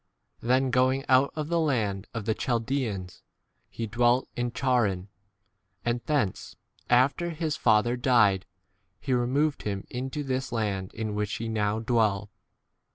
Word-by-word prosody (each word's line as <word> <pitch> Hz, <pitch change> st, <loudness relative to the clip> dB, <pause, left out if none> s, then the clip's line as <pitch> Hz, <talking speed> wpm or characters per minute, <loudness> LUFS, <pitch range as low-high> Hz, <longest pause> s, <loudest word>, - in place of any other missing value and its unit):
Then 130 Hz, +2 st, +2 dB
going 130 Hz, +2 st, +2 dB
out 130 Hz, +1 st, +4 dB
of 155 Hz, -1 st, -3 dB
the 170 Hz, 0 st, +2 dB
land 110 Hz, -10 st, 0 dB
of 115 Hz, -3 st, -5 dB
the 110 Hz, -, +2 dB
Chaldeans 115 Hz, -7 st, -2 dB, 0.5 s
he 115 Hz, -, -4 dB
dwelt 120 Hz, +3 st, +2 dB
in 120 Hz, 0 st, -1 dB
Charran, 110 Hz, -8 st, 0 dB, 0.8 s
and 120 Hz, 0 st, 0 dB
thence, 140 Hz, -11 st, -1 dB, 0.3 s
after 135 Hz, +8 st, +3 dB
his 160 Hz, -2 st, -2 dB
fa 105 Hz, -2 st, +4 dB
ther 120 Hz, +1 st, -1 dB
died, 115 Hz, -7 st, +3 dB, 0.5 s
he 135 Hz, +3 st, -2 dB
removed 135 Hz, +5 st, +1 dB
him 100 Hz, -1 st, -4 dB
into 130 Hz, +4 st, -3 dB
this 130 Hz, -1 st, -2 dB
5 -, -, -9 dB
land 100 Hz, -5 st, -2 dB
in 110 Hz, -1 st, -3 dB
which 105 Hz, -1 st, -2 dB
ye 115 Hz, 0 st, -3 dB
now 105 Hz, -1 st, 0 dB
dwell. 110 Hz, -4 st, +1 dB
120 Hz, 150 wpm, -27 LUFS, 105-130 Hz, 0.8 s, out